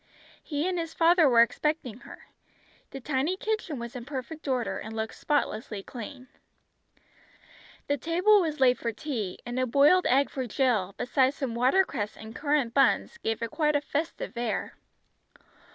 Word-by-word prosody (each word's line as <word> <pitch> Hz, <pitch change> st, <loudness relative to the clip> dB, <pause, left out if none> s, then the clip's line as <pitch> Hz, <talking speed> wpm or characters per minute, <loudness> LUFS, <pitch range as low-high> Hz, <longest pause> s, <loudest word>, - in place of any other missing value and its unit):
He 300 Hz, +2 st, -2 dB
and 365 Hz, -2 st, -1 dB
his 330 Hz, -1 st, -5 dB
father 335 Hz, -2 st, +5 dB
were 235 Hz, -2 st, +7 dB
expecting 255 Hz, -2 st, -2 dB
her. -, -, -13 dB, 0.6 s
The 270 Hz, -, -7 dB
tiny 285 Hz, +7 st, -1 dB
kitchen 430 Hz, -8 st, -2 dB
was 235 Hz, 0 st, -7 dB
in 245 Hz, -, -6 dB
perfect 285 Hz, +4 st, -7 dB
order, 255 Hz, -3 st, -1 dB
and 220 Hz, +1 st, -7 dB
looked 220 Hz, 0 st, -3 dB
spotlessly 225 Hz, -8 st, -2 dB
clean. 255 Hz, +3 st, -9 dB, 1.6 s
The 285 Hz, -, 0 dB
table 360 Hz, -, +4 dB
was 310 Hz, -4 st, -2 dB
laid 250 Hz, -2 st, +4 dB
for 230 Hz, -, -2 dB
tea; 220 Hz, -6 st, -4 dB
and 240 Hz, +1 st, -3 dB
a 255 Hz, -, +1 dB
boiled 290 Hz, +9 st, +5 dB
egg 275 Hz, +3 st, +3 dB
for 260 Hz, -2 st, -3 dB
Jill, 220 Hz, -7 st, 0 dB
besides 265 Hz, +1 st, +2 dB
some 265 Hz, -5 st, -3 dB
watercress 250 Hz, -, +1 dB
and 220 Hz, +2 st, -10 dB
currant 285 Hz, -5 st, 0 dB
buns, 280 Hz, -, +2 dB
gave 225 Hz, +1 st, -2 dB
it 230 Hz, -, -3 dB
quite 305 Hz, -1 st, +1 dB
a 290 Hz, -, +2 dB
festive 295 Hz, -1 st, -4 dB
air. 235 Hz, -4 st, -2 dB
270 Hz, 160 wpm, -28 LUFS, 235-305 Hz, 1.6 s, were